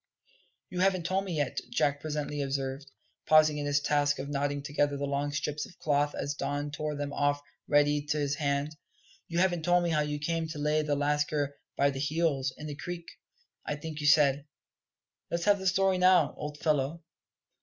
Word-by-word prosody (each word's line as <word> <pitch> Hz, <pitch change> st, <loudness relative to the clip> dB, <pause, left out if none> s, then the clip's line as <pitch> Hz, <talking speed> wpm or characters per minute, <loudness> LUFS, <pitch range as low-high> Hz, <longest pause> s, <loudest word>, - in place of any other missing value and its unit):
"You 180 Hz, -, -4 dB
haven't 185 Hz, -2 st, +2 dB
told 190 Hz, +3 st, 0 dB
me 185 Hz, -, -4 dB
yet," 145 Hz, -3 st, -1 dB
Jack 145 Hz, 0 st, +1 dB
presently 150 Hz, -1 st, -3 dB
observed, 135 Hz, 0 st, -3 dB, 0.4 s
pausing 155 Hz, -1 st, +5 dB
in 145 Hz, -, -2 dB
his 145 Hz, 0 st, +2 dB
task 145 Hz, 0 st, +1 dB
of 135 Hz, +2 st, -5 dB
knotting 145 Hz, 0 st, -1 dB
together 145 Hz, -1 st, 0 dB
the 140 Hz, -, -2 dB
long 140 Hz, +1 st, -1 dB
strips 145 Hz, +1 st, -2 dB
of 180 Hz, -, -18 dB
cloth 145 Hz, -1 st, +1 dB
as 145 Hz, -, -2 dB
Don 145 Hz, 0 st, -3 dB
tore 150 Hz, 0 st, -3 dB
them 145 Hz, 0 st, -4 dB
off 145 Hz, 0 st, +1 dB, 0.3 s
ready 145 Hz, 0 st, +3 dB
to 155 Hz, 0 st, 0 dB
his 145 Hz, -1 st, 0 dB
hand; 140 Hz, +1 st, -1 dB, 0.5 s
"you 170 Hz, -, -4 dB
haven't 175 Hz, -2 st, +2 dB
told 175 Hz, +2 st, +3 dB
me 170 Hz, -, 0 dB
how 155 Hz, -1 st, +2 dB
you 150 Hz, 0 st, -2 dB
came 165 Hz, +2 st, -1 dB
to 160 Hz, -1 st, -6 dB
lay 150 Hz, +1 st, +1 dB
the 150 Hz, -1 st, 0 dB
lascar 145 Hz, 0 st, 0 dB, 0.2 s
by 140 Hz, 0 st, +3 dB
the 135 Hz, -, -5 dB
heels 145 Hz, -2 st, 0 dB
in 150 Hz, -, -8 dB
the 150 Hz, -, -4 dB
creek, 170 Hz, +3 st, -6 dB, 0.6 s
I 150 Hz, -, -3 dB
think 155 Hz, +1 st, -6 dB
you 145 Hz, -, 0 dB
said? 145 Hz, -1 st, +4 dB, 0.8 s
Let's 170 Hz, 0 st, -2 dB
have 205 Hz, -1 st, +4 dB
the 190 Hz, -, -2 dB
story 190 Hz, 0 st, +3 dB
now, 180 Hz, -5 st, +5 dB
old 150 Hz, 0 st, -6 dB
fellow." 150 Hz, +1 st, 0 dB
150 Hz, 195 wpm, -29 LUFS, 145-160 Hz, 0.8 s, pausing